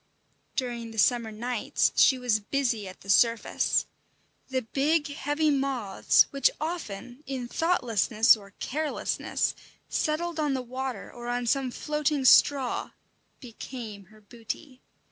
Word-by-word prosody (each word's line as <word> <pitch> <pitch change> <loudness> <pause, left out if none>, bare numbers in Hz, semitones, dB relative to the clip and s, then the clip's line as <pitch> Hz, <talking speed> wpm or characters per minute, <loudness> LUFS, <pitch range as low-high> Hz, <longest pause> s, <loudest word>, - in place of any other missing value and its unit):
During 240 -3 -3
the 225 - -11
summer 235 0 +2
nights 235 +2 0
she 265 - +5
was 245 -4 +1
busy 230 -2 -1
at 185 - -11
the 195 - -13
surface. 230 +2 +2 0.6
The 260 -1 -1
big, 295 +6 +1
heavy 290 +2 0
moths, 265 -8 +2
which 275 -1 +3
often, 285 - -5
in 260 -3 -4
thoughtlessness 235 - +3
or 200 -2 -15
carelessness, 305 +2 -1 0.4
settled 325 +1 -1
on 295 -3 +1
the 255 - -3
water 255 +1 -5
or 240 0 -8
on 245 0 -1
some 265 +2 +1
floating 300 +1 -1
straw, 265 -1 +4 0.5
became 230 -4 -8
her 215 +3 -20
booty. 240 +5 -8
250 Hz, 125 wpm, -27 LUFS, 230-285 Hz, 0.6 s, she